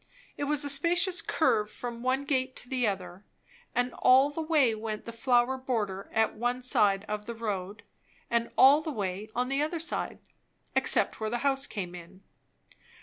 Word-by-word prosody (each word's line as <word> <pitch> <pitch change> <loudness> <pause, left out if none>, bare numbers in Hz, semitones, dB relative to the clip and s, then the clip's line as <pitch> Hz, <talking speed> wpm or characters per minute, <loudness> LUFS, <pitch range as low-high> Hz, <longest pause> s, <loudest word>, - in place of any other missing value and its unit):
It 285 - -3
was 290 0 0
a - - -1
spacious 350 +4 +1
curve 215 -11 +1
from 235 0 -7
one 260 +2 0
gate 260 -2 0
to - - -6
the 250 -2 0
other; 185 -1 -4 0.5
and 245 0 0
all 265 +3 +6
the 325 - -4
way 305 -7 +3
went 215 -1 -5
the 230 - -6
flower 245 +2 +2
border 210 -7 -3
at 220 0 +2
one 245 +3 -2
side 205 -5 +2
of 210 0 -4
the 235 - -5
road, 205 -3 -4 0.4
and 235 0 0
all 280 +3 +7
the 315 - -5
way 205 -4 -4
on 250 +1 0
the 275 +2 0
other 315 +3 -1
side, 330 - -3 0.6
except - - +2
where 220 -1 -2
the 240 +3 -3
house 275 0 +2
came 180 -5 -5
in. 180 +2 -12
240 Hz, 180 wpm, -29 LUFS, 210-275 Hz, 0.6 s, all